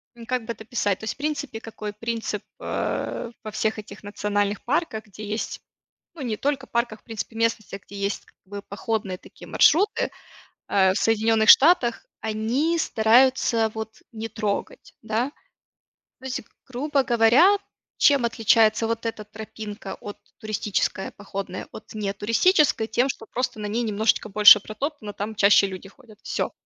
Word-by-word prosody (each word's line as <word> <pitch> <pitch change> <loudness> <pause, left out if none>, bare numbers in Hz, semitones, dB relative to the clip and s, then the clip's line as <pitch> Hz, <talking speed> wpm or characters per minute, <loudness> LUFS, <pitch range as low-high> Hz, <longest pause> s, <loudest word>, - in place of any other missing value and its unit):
м, 230 -1 -11
как 250 -2 -2
бы 235 - -3
это 220 - -12
описать? 205 -4 -1
То - - -14
есть - - -2
в - - -34
принципе, 290 -6 -3
какой 215 -2 -7
принцип, 230 +1 -4 0.2
а, 235 - -3
во 215 - -6
всех 220 +1 -1
этих 210 - -11
национальных 205 0 -1
парках, 250 -6 -1
где 210 +1 -11
есть, 215 +2 -4 0.5
ну, 305 - -8
не 225 -4 -2
только 275 0 -1
парках, 235 -2 -2
в - - -43
принципе 225 0 -6
местностях, 220 -3 -1
где 200 - -12
есть 200 0 -2
как - - -26
бы 200 +1 -8
походные 200 -3 -3
такие - - -14
маршруты, 400 +7 +3 0.6
э, 190 -1 +4
в - - -4
Соединенных 220 +1 +2
Штатах, 270 -6 +6 0.2
они 230 +10 0
стараются 230 -2 +3
вот 220 0 -7
не 225 0 -5
трогать, 220 - -4
да, 225 +5 -1 0.9
то 260 - -18
есть, 255 - -3 0.3
грубо 275 +2 0
говоря, 245 - +5 0.4
чем 280 -4 +5
отличается 225 0 +3
вот 230 0 -2
эта 215 -2 -4
тропинка 210 -1 -8
от, 205 - -8 0.2
туристическая, 210 -3 -2
походная, 195 -2 -6
от 215 - -12
не 205 -2 -2
туристической- 230 - +3
тем, 245 +4 +1
что 225 - -5
просто 250 -3 -3
на 210 - -3
ней 225 +4 -1
немножечко 215 0 +1
больше 210 +1 +9
протоптано, 215 0 -5
там 215 +2 -5
чаще 200 0 +6
люди 190 +1 -8
ходят. 220 -2 -18
Всё. - - -2
220 Hz, 160 wpm, -24 LUFS, 210-240 Hz, 0.9 s, больше